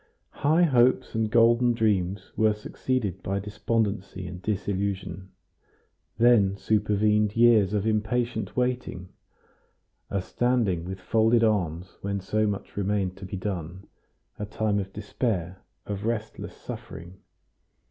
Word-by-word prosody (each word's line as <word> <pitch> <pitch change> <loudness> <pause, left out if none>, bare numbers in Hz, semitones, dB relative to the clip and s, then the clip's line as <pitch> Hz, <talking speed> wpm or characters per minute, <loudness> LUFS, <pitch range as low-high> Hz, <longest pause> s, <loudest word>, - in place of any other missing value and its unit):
High 160 +5 +4
hopes 130 -4 +3
and 110 -1 0
golden 120 +1 +4
dreams 100 -4 0
were 110 -1 +3
succeeded 105 -2 -3
by 100 +1 -2
despondency 100 -2 -2
and 90 +1 -7
disillusion; 95 -2 -3 0.9
then 110 -5 +4
supervened 105 0 +2
years 115 -5 +5
of 105 -1 0
impatient 110 +4 -1
waiting, 125 -7 -2 1.0
a 100 - -1
standing 105 -4 0
with 95 +1 -6
folded 115 +5 +3
arms 90 -5 -1
when 100 0 -2
so 110 +3 0
much 100 -1 -4
remained 100 -2 -1
to 95 - -8
be 95 - -5
done, 90 -1 -5 0.5
a 105 - -2
time 105 0 0
of 95 -1 -5
despair, 100 -4 -3 0.3
of 100 -1 -4
restless 110 -1 -3
suffering. 85 +2 -9
105 Hz, 120 wpm, -26 LUFS, 95-115 Hz, 1.0 s, years